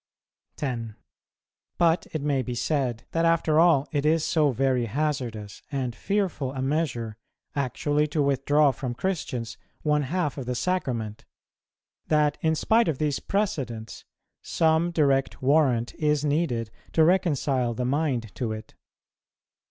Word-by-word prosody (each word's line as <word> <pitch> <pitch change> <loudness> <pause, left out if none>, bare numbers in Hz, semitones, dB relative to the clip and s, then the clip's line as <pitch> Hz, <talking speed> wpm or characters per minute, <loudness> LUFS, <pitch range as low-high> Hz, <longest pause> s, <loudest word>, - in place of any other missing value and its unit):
10. 115 -6 -4 0.8
But 170 0 +2
it 155 -3 -3
may 140 -3 +1
be 125 -1 -4
said, 125 -4 -1
that 165 - +1
after 165 -2 +3
all 165 -5 +4
it 145 -3 0
is 155 +1 +2
so 155 -3 +3
very 130 -1 +1
hazardous 120 -6 -3
and 130 -4 -2
fearful 180 -8 -1
a 130 - -4
measure 130 -7 -1 0.4
actually 145 +2 0
to 150 0 0
withdraw 140 +1 +3
from 130 -1 -5
Christians 125 -9 -3 0.2
one 150 -1 +2
half 150 0 -2
of 125 - -6
the 125 - -1
Sacrament, 120 - -2 0.8
that, 150 -1 +2
in 160 0 +2
spite 225 +8 +3
of 155 -5 0
these 150 -1 0
precedents, 135 - -3 0.4
some 160 +1 +2
direct 140 -5 +1
warrant 130 -4 +3
is 150 -1 0
needed 140 -7 0 0.2
to 160 - +5
reconcile 145 -8 +2
the 125 - -2
mind 130 -6 -1
to 115 -3 -2
it. 110 0 -9
145 Hz, 135 wpm, -26 LUFS, 125-160 Hz, 0.8 s, to